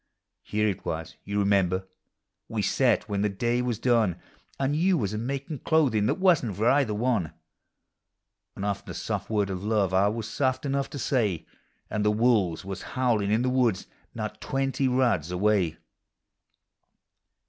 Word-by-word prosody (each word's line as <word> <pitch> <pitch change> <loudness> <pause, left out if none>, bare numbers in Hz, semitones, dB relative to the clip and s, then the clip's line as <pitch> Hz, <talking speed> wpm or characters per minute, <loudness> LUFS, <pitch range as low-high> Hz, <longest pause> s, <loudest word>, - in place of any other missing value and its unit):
Here 105 0 0
it 100 -4 -2
was, 80 +1 -4
you 100 0 -3
remember, 95 -2 +2 0.6
we 110 -2 -2
sat 120 +3 +2
when 100 -2 -1
the 105 - +2
day 120 +5 0
was 125 -3 -1
done. 115 -6 +2 0.4
And 135 +2 +1
you 180 +3 +3
was 105 -6 -1
a - - -2
makin' 140 +4 -4
clothing 125 -11 +2
that - - +3
teuton 180 -9 +4
t - - -4
for 110 - -1
cither 110 -7 0
one; 110 -8 0 1.2
And 100 - -4
often 100 -1 -3
a - - -5
soft - - -3
word 105 -3 0
of 95 0 -5
love 105 -3 +1
I 95 +2 +4
was 110 +1 -2
soft 130 +2 -1
enough 140 0 -1
to - - -7
say, 110 - 0 0.4
And 105 - -2
the 105 - +3
wolves 105 -6 +2
was 95 -1 -5 0.2
howlin' 115 -6 +2
in 110 +3 +2
the 130 - +1
woods 120 -7 +1 0.3
not 110 -2 -5
twenty 135 -1 0
rods 120 - +1
away. 90 -2 +1
110 Hz, 170 wpm, -27 LUFS, 100-130 Hz, 1.2 s, teuton